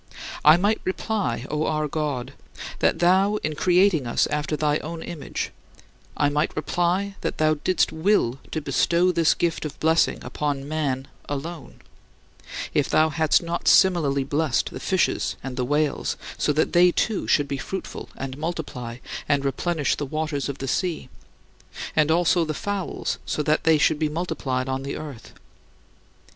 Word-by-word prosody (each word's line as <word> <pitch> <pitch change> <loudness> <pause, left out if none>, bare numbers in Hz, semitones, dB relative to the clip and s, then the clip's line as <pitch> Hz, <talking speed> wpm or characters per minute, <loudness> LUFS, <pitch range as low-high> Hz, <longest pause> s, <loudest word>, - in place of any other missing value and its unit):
I 155 +2 +8
might 205 +4 +1
reply, 185 - -2
O 150 +1 0
our 155 -1 0
God, 145 -5 -3 0.5
that - - +2
thou 190 +4 +4
in 155 - -1
creating 180 -3 +3
us 120 - +2
after 150 0 -1
thy 150 -1 +2
own 165 +1 -6
image 160 -5 -5 0.7
I 145 - +3
might 150 +1 0
reply 180 +5 0
that - - -3
thou 155 0 +3
didst 185 - +2
will 160 - +1
to 155 - -3
bestow 175 +4 +2
this 165 -2 +3
gift 170 -1 -1
of 150 -1 -6
blessing 160 +1 +3
upon 145 -2 -3
man 140 -4 -2 0.2
alone, 145 +1 -6 0.9
if 145 - +1
thou 155 0 +4
hadst 155 +2 +2
not 170 +1 -3
similarly 155 -8 +4
blessed 145 -1 0
the - - -7
fishes - - 0
and 130 -1 -5
the 125 - -1
whales, 145 +3 0 0.2
so - - +1
that 155 +2 +1
they 175 +1 +6
too 215 +3 -1
should 145 -1 +3
be 140 - -3
fruitful 190 - -6
and 135 +1 -5
multiply 145 -8 -4 0.3
and 140 -1 +2
replenish 150 +2 0
the 145 - -2
waters 155 -1 -2
of 140 - -4
the 135 - -5
sea; 165 -1 -1 0.9
and 155 -1 +3
also 170 +1 +3
the 155 -1 -3
fowls, 200 +1 -3
so 150 - -2
that 155 +2 +1
they 160 -1 +5
should 150 +1 +2
be 155 -1 +1
multiplied 150 -6 -2
on 130 0 -2
the 140 +1 -4
earth. 140 -7 -9
155 Hz, 160 wpm, -24 LUFS, 140-170 Hz, 0.9 s, I